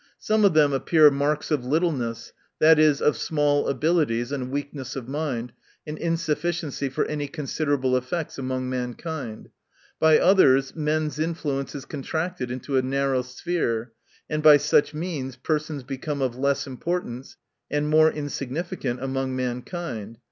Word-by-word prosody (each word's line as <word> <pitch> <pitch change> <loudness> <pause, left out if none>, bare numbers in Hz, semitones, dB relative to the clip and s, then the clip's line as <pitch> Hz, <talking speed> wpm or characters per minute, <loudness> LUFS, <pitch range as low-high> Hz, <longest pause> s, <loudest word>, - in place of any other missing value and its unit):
— - - -51
Some 215 0 +1
of 195 - +4
them 145 -2 +5
appear 150 +2 +5
marks 145 +2 -1
of 145 -5 +1
littleness, 125 -6 -1 0.3
i. 160 +1 +7
e., 155 -2 +5
of 150 - +3
small 145 -2 +1
abilities, 140 -4 +1
and 130 -3 -3
weakness 140 -1 -5
of 130 -3 -6
mind, 130 -5 -3 0.3
and 150 - -5
insufficiency 165 -3 -1
for 130 - -1
any 150 -1 -3
considerable 140 -3 -1
effects 140 +5 -3
among 130 -1 -2
mankind. 125 0 -5 0.3
— - - -33
By 160 -1 +6
others, 135 -9 +4
men's 155 -1 -1
influence 150 -5 -2
is 135 -2 -6
contracted 160 -1 -3
into 130 +2 -2
a - - +4
narrow 135 0 0
sphere, 125 -4 -2 0.3
and 155 0 -2
by 150 -1 +9
such 145 +1 +2
means 150 -6 -4
persons 150 +1 -2
become 140 +3 -4
of 125 -2 -1
less 140 +2 0
importance, 135 -2 -4 0.3
and 145 +1 0
more 155 +1 +5
insignificant 140 -2 -4
among 135 -1 -2
mankind. 125 - -4
145 Hz, 150 wpm, -25 LUFS, 130-155 Hz, 0.3 s, by